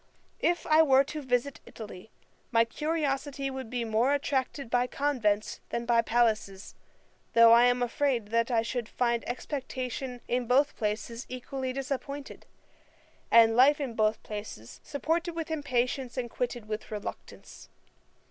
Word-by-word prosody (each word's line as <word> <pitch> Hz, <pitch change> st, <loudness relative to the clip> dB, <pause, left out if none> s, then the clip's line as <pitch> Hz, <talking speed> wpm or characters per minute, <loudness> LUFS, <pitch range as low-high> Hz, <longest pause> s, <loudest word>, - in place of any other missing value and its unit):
If 345 Hz, 0 st, +1 dB
I 310 Hz, 0 st, +5 dB
were 270 Hz, -3 st, +5 dB
to 300 Hz, +2 st, -6 dB
visit 260 Hz, +1 st, -1 dB
Italy, 210 Hz, -2 st, -10 dB, 0.4 s
my 230 Hz, -1 st, +4 dB
curiosity 280 Hz, 0 st, -2 dB
would 265 Hz, -3 st, -6 dB
be 245 Hz, -1 st, -2 dB
more 230 Hz, +6 st, +2 dB
attracted 275 Hz, -1 st, -2 dB
by 245 Hz, +1 st, +1 dB
convents 240 Hz, -7 st, 0 dB
than 235 Hz, 0 st, -3 dB
by 235 Hz, -1 st, +4 dB
palaces: 220 Hz, -4 st, 0 dB, 0.6 s
though 230 Hz, 0 st, +8 dB
I 235 Hz, +1 st, +7 dB
am 245 Hz, 0 st, +2 dB
afraid 245 Hz, -3 st, 0 dB
that 230 Hz, +2 st, +1 dB
I 230 Hz, -2 st, +2 dB
should 235 Hz, -1 st, -3 dB
find 235 Hz, -1 st, 0 dB
expectation 255 Hz, -1 st, -4 dB
in 245 Hz, -1 st, -1 dB
both 275 Hz, +4 st, +3 dB
places 220 Hz, +3 st, -3 dB
equally 255 Hz, +1 st, -4 dB
disappointed, 275 Hz, +1 st, -5 dB, 0.8 s
and 225 Hz, -1 st, +6 dB
life 275 Hz, +5 st, +6 dB
in 270 Hz, -5 st, -3 dB
both 215 Hz, -1 st, +1 dB
places 205 Hz, -, -8 dB
supported 330 Hz, +4 st, -2 dB
with 325 Hz, -1 st, -4 dB
impatience 260 Hz, -4 st, -1 dB
and 240 Hz, -2 st, -3 dB
quitted 240 Hz, -3 st, -3 dB
with 215 Hz, 0 st, -5 dB
reluctance. 210 Hz, -2 st, -8 dB
250 Hz, 140 wpm, -29 LUFS, 230-275 Hz, 0.8 s, though